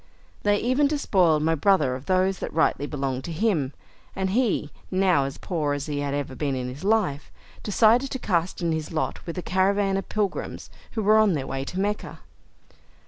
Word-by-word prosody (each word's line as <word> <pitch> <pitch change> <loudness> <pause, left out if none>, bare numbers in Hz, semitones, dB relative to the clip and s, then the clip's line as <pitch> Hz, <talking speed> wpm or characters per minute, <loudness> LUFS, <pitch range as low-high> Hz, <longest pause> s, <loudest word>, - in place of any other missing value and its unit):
They 205 0 +3
even 255 +6 +2
despoiled 185 - +2
my 165 +1 +2
brother 160 -5 +3
of 130 +2 -7
those 185 0 +2
that - - -4
rightly 145 -2 +1
belonged 135 -3 -3
to 170 - -5
him, 160 -7 0 0.4
and 190 -1 -1
he, 215 - +1 0.2
now 185 -7 +3
as 135 - -5
poor 155 -5 -2
as 145 0 -4
he 145 -2 -3
had 140 0 -2
ever 145 -2 -3
been 140 0 -2
in 125 -1 -3
his 135 +6 -9
life, 195 -9 0 0.3
decided 230 +5 +3
to 260 - -3
cast 180 -6 -1
in 170 - +1
his 160 -1 -3
lot 160 -1 -2
with 170 - -5
a 180 - -3
caravan 195 +1 +1
of 195 - -5
pilgrims 205 -3 -3 0.2
who 220 - -2
were 215 +2 +5
on 215 -3 +4
their 140 -4 -2
way 135 0 -3
to 180 - -5
Mecca. 205 +2 -3
180 Hz, 195 wpm, -25 LUFS, 145-205 Hz, 0.4 s, were